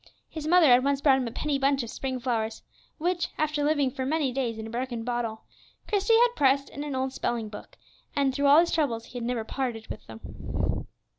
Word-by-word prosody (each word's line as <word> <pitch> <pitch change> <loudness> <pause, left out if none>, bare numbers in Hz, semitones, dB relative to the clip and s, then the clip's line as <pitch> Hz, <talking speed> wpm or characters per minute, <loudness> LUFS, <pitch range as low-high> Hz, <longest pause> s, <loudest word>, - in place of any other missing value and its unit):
His 310 -1 -6
mother 350 0 +6
had 250 -2 +6
once 280 0 +1
bought 275 -2 +4
him 250 - -2
a - - -5
penny 290 +3 -1
bunch 275 -1 +2
of 230 - -7
spring 260 -1 -3
flowers, 225 -3 -2 0.3
which, 345 0 0
after 305 -1 0
living 290 -3 +2
for 260 - -4
many 285 0 0
days 245 -3 -2
in 220 - -6
a - - -7
broken 240 -1 -3
bottle, 235 -2 -3 0.4
Christie 415 +2 +3
had 485 +1 +4
pressed 275 0 +2
in 285 - -6
an 290 -2 -4
old 260 0 -1
spelling 230 -4 -2
book, 210 - -11 0.4
and 275 -2 +2
through 280 +1 +1
all 285 +3 +8
his 345 - 0
troubles 235 -8 0
he 245 - -7
had - - -5
never 245 -2 -1
parted 230 -1 -3
with - - -8
them. 110 0 -4
265 Hz, 220 wpm, -27 LUFS, 240-295 Hz, 0.4 s, all